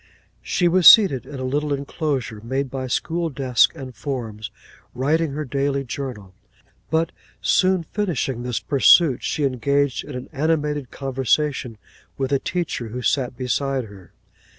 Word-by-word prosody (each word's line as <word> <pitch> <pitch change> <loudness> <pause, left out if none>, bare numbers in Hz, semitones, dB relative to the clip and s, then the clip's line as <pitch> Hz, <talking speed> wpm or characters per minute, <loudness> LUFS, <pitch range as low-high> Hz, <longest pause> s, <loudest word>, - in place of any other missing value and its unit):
She 175 - +1
was 175 0 +5
seated 155 - +7
in 145 - -8
a - - -4
little 145 +3 -1
enclosure, 140 -5 -3
made 130 +3 -3
by 130 -1 -4
school 165 +6 -1
desks 130 -2 +2
and 130 -5 -9
forms, 110 -4 -5 0.5
writing 150 +4 0
her 150 +1 -3
daily 140 +1 -1
journal. 120 -7 -6 0.6
But 165 +1 +1 0.3
soon 185 -2 +2
finishing 155 - -2
this 125 -1 -2
pursuit, 140 0 +4
she 150 - -2
engaged 140 +1 0
in 145 - -9
an 125 - -6
animated 150 -2 -1
conversation 135 -2 -1 0.4
with 135 0 -2
a 140 - +2
teacher 170 -9 -3
who 125 +3 -6
sat 125 -2 0
beside 135 +1 -1
her. 100 -4 -14
135 Hz, 145 wpm, -22 LUFS, 125-150 Hz, 0.6 s, seated